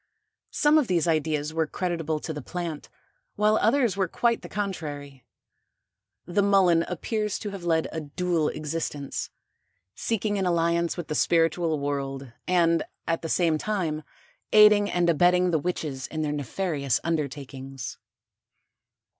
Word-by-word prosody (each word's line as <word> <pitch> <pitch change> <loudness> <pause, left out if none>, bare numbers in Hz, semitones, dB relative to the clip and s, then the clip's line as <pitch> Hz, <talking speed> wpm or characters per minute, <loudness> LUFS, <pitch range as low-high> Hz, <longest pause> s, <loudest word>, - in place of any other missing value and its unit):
Some 300 +1 +4
of 280 - 0
these 175 -2 +1
ideas 155 -1 0
were 160 -1 0
creditable 165 -2 -2
to 160 - -4
the 150 - -6
plant, 170 0 -5 0.5
while 215 +1 +3
others 235 -1 +3
were 195 -2 +1
quite 235 +6 +1
the - - -9
contrary. 145 - -5 1.0
The 180 +3 +1
Mullen 190 -4 +4
appears 210 +4 -2
to 205 - -5
have 195 -3 -7
led 160 -1 +2
a 160 - -4
dual 160 +1 0
existence, 150 -2 -4 0.6
seeking 210 - -1
an 190 - 0
alliance 170 0 +1
with 175 - -5
the - - -3
spiritual 165 0 +2
world 135 -2 -3
and 170 -2 +3 0.3
at 165 0 0
the 165 - -5
same 165 -3 +2
time 170 -7 -1 0.5
aiding 210 -1 +7
and 175 -1 +1
abetting 180 +2 +4
the 160 - +2
witches 150 -6 -3
in 155 -1 -3
their 150 - -1
nefarious 145 -2 -1
undertakings. 135 -4 -4
165 Hz, 140 wpm, -26 LUFS, 150-185 Hz, 1.0 s, aiding